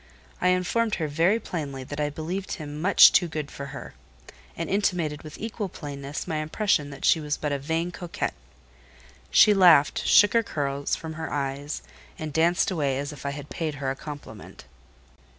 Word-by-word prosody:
I 180 - +3
informed 185 +5 +1
her 160 -3 -2
very 170 +9 +2
plainly 140 -10 -5
that 145 +3 -7
I 150 0 0
believed 170 +6 -4
him 150 -3 -6
much 200 +4 +8
too 175 - +3
good 155 -3 -5
for 140 - -7
her, - - -9 0.6
and 165 - -3
intimated 175 -6 0
with 155 -1 -10
equal 215 -2 -4
plainness 145 -2 -6
my 160 - -2
impression 155 -1 0
that 140 -1 -6
she 165 - +5
was 150 -1 -2
but 150 - -3
a 140 - -1
vain 165 +5 -2
coquette. 175 0 -4 1.0
She 210 - +6
laughed, 175 -7 +5
shook 205 -1 +6
her 230 - +4
curls 140 -8 -2
from 160 -1 -7
her 160 0 -6
eyes, 140 - -3 0.3
and 155 -2 -6
danced 170 +5 +2
away 145 -7 0
as 145 +2 -4
if 145 - -7
I - - 0
had 145 0 -7
paid 160 -3 -3
her 135 -1 -2
a - - -4
compliment. 140 - -10
155 Hz, 185 wpm, -26 LUFS, 145-175 Hz, 1.0 s, much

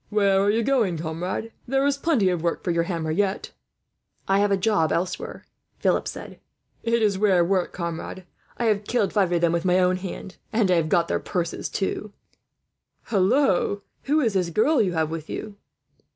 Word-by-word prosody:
"Where 200 -2 +3
are 200 - +2
you 225 +2 +2
going, 225 -10 +1
comrade?" 165 +5 -3
he 225 - -11
said. - - -34
"There 270 +2 +1
is 285 -1 +2
plenty 275 - +2
of 175 -3 -1
work 170 0 -1
for 180 - 0
your 170 0 +1
hammer, 165 -3 -2
yet." 195 +3 -1 0.8
"I 195 +1 +3
have 205 0 +3
a 195 - +3
job 190 -5 +1
elsewhere," 180 +2 -3 0.3
Philip - - +1
said. - - -8 0.4
"It 230 -1 +1
is 200 -3 +2
rare 190 -4 +4
work, 185 0 0
comrade. 170 +1 -5 0.3
I 240 - -1
have 210 -2 +1
killed 225 -4 0
five 195 -4 +2
of 170 -1 +1
them 170 -1 +3
with 170 0 0
my 180 0 +3
own 185 0 +3
hand, 185 0 -7
and 215 -4 +2
I - - +5
have 160 -1 0
got 170 0 +2
their - - 0
purses, 170 -2 -3
too," 195 - -1
he - - -1
chuckled. 210 -1 -7 1.2
"Hallo! 215 -6 +2 0.2
Who 300 +3 +2
is 225 -6 +1
this 180 -3 0
girl 230 - +3
you 185 -4 0
have 160 -2 0
with 160 -1 -6
you?" 210 -2 -6
190 Hz, 210 wpm, -24 LUFS, 170-215 Hz, 1.2 s, I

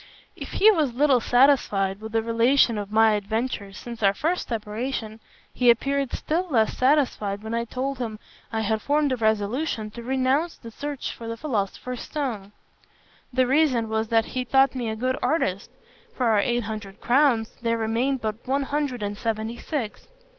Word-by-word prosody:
If - - -8
he 435 +2 +6
was 300 - 0
little 275 -1 +4
satisfied 225 -6 +3
with 220 0 -8
the 225 0 +1
relation 230 0 +3
of 205 0 -6
my 220 0 +5
adventures 210 -1 -3
since 235 -1 -8
our 200 -1 +3
first 335 - -1
separation, 220 0 -4 0.3
he 250 -1 +3
appeared 275 +3 +2
still 345 +4 -1
less 225 -6 +2
satisfied 255 -7 +1
when 220 +1 -5
I 235 0 -1
told 260 +3 -3
him 225 -3 -4 0.3
I 220 -1 -1
had 220 0 0
formed 290 0 +1
a - - +2
resolution 220 +2 -1
to 235 - -8
renounce 265 +6 0
the 230 - -11
search 285 +3 -5
for 230 - -9
the 230 0 -4
philosopher's 240 -1 -3
stone. 235 -10 -4 0.8
The 255 0 +3
reason 260 -4 +2
was 220 0 -1
that 225 0 +2
he 255 - -3
thought 270 +1 +3
me 245 -3 -3
a 220 - -3
good 255 +4 -1
artist. 200 - 0 0.5
Of - - -9
our 225 -4 +4
eight 240 +3 +1
hundred 210 -2 -7
crowns, 245 -4 +2
there 230 -1 0
remained 235 +4 0
but 220 +2 -4
one 275 +2 +1
hundred 275 -5 -2
and 205 0 -3
seventy 220 +1 -3
six. 255 -9 -4
235 Hz, 175 wpm, -25 LUFS, 220-270 Hz, 0.8 s, he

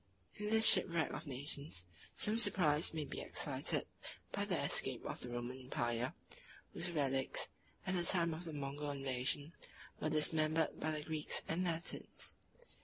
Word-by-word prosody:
In 210 0 -3
this 220 0 +4
shipwreck 170 -6 +5
of - - -6
nations, 140 - -2 0.3
some 215 +2 0
surprise 175 -8 +5
may 155 -2 -3
be - - -6
excited - - -1 0.5
by - - -2
the - - -1
escape - - +1
of - - -5
the 125 - -8
Roman 120 +2 -5
empire, 120 -1 -2 0.6
whose 175 - -1
relics, 135 -4 0 0.4
at 190 - -1
the 180 - +1
time 170 -2 +5
of 165 +3 -7
the 165 - -6
Mogul 145 0 -4
invasion, 140 +2 -1 0.5
were 155 - -1
dismembered 155 +1 +3
by 155 - -1
the 155 -1 -3
Greeks 155 -1 0
and 180 +3 -1
Latins. 165 -1 -2
155 Hz, 155 wpm, -37 LUFS, 135-170 Hz, 0.6 s, shipwreck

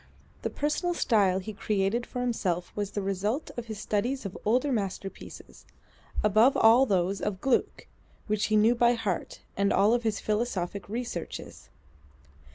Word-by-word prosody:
The - - -2
personal 325 +4 -1
style 200 - +3
he 195 +3 -5
created 205 +3 -1
for 250 - -4
himself 185 -8 -1
was 205 -1 -2
the 205 -1 -4
result 200 - -2
of 240 -1 -6
his 220 -1 -6
studies 230 +6 -1
of 195 - -5
older 250 +6 +2
masterpieces, 195 -4 -5 0.6
above 215 +5 +4
all 235 +4 +6
those 190 -1 0
of 200 -3 -2
Gluck 265 +4 0 0.4
which 215 -1 0
he 215 - +1
knew 215 +3 +5
by 240 0 +4
heart, 210 -7 -3
and 200 0 +1
of 225 +4 +3
his 220 -3 -1
philosophic 205 -3 -2
researches. 225 -6 -6
215 Hz, 150 wpm, -28 LUFS, 195-240 Hz, 0.6 s, all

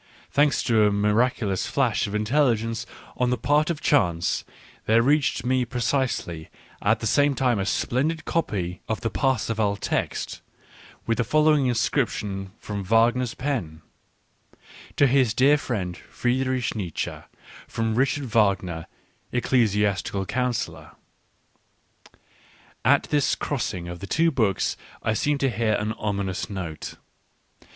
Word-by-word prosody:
Thanks 145 -1 +3
to 110 -2 +4
a - - +2
miraculous 105 0 +1
flash 120 -9 +1
of 100 - -5
intelligence 115 -1 +1 0.3
on 125 -1 +1
the 125 - +1
part 145 +6 +2
of 165 -4 -2
chance, 85 - +2 0.4
there 115 +2 +5
reached 140 -3 +2
me 130 0 +2
precisely 120 - -2 0.3
at 110 +2 +2
the - - -3
same 145 +5 +3
time 125 -5 +1
a 95 - -1
splendid 150 +10 0
copy 90 - -2
of 110 - -2
the 115 -2 -2
Parsifal 110 -1 0
text, - - -3 0.6
with 115 0 0
the - - +3
following 150 +2 +3
inscription 110 -5 -1
from 100 -2 -5
Wagner's 115 +4 +2
pen: 100 - -3 1.1
"To 145 - +6
his 130 -4 +3
dear 140 +3 +5
friend 100 -11 -3
Friedrich 130 +4 -1
Nietzsche, 90 -7 -3 0.5
from 115 -1 -1
Richard 135 +4 +1
Wagner, 100 -7 +1 0.4
Ecclesiastical 105 -5 +1
Councillor." 120 +1 -2 1.9
At - - +4
this 145 -2 +2
crossing 105 -11 -3
of 85 0 -7
the 100 - -7
two 165 +9 +2
books 110 - +1 0.3
I 110 - +1
seemed 145 +5 0
to 135 -2 +2
hear 110 0 +1
an 105 +1 -1
ominous 100 -3 -3
note. 90 -6 -6
115 Hz, 130 wpm, -25 LUFS, 100-130 Hz, 1.9 s, To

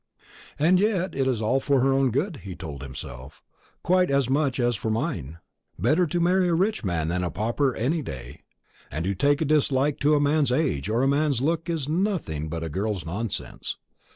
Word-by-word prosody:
"And 175 +5 +4
yet 190 -3 +1
it's 130 -4 0
all 125 +5 +2
for 140 0 +2
her 135 +1 +3
own 135 -1 +3
good," 145 - -1
he 95 -6 -8
told 70 -6 -7
himself, 65 -1 -9 0.4
"quite 185 +1 +3
as 140 -2 +1
much 140 -2 +1
as 120 -1 +2
for 110 - -3
mine. 110 - -2 0.4
Better 175 +3 +2
to 175 +4 -1
marry 180 +2 +3
a 170 - +2
rich 195 - 0
man 85 -5 -1
than 90 +1 -1
a 90 - -1
pauper 120 +8 0
any 150 +8 0
day; 65 - -8 0.5
and 80 +4 -3
to 100 - 0
take 145 - +2
a - - +2
dislike 145 -1 +2
to 150 +1 +4
a - - +3
man's 145 -1 +2
age 125 - 0
or 115 +4 +1
a - - +3
man's 140 -2 +2
looks 165 +4 0
is 160 -5 -2
nothing 155 - -1
but 80 +1 -4
a - - -2
girl's 95 +2 -2
nonsense. 100 +6 -4
135 Hz, 200 wpm, -25 LUFS, 100-155 Hz, 0.5 s, And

